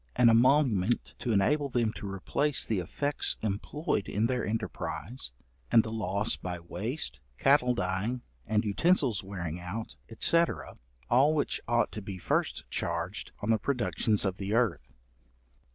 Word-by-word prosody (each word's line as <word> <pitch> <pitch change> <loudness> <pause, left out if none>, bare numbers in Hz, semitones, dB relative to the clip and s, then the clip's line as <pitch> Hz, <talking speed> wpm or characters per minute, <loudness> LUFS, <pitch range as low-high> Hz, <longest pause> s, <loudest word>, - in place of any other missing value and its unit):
An 120 - +6
emolument 120 -3 +3
to 120 - -1
enable 140 +8 +2
them 120 -3 +1
to 100 -2 -6
replace 130 +9 -1
the 110 -4 0
effects 145 - -1
employed 105 +3 -1
in 105 +3 +1
their 125 -1 0
enterprise, 85 - -4 0.4
and 115 - +7
the 110 - -5
loss 105 -1 0
by 90 -1 -5
waste, 105 - -3 0.2
cattle 130 -3 +4
dying, 100 +6 -1 0.2
and 110 +1 +1
utensils 125 - +2
wearing 90 -4 -5
out, 95 +6 -6 0.2
&c, 170 - +5 0.7
all 140 +6 +4
which 145 - -1
ought 120 0 +2
to 105 - -6
be 95 -1 -6
first - - -1
charged 85 +4 -3
on 110 - +2
the 110 - +3
products 135 -4 -2 0.2
of 95 -1 -1
the 100 +2 -2
earth. 110 - +1
110 Hz, 145 wpm, -30 LUFS, 95-125 Hz, 0.7 s, and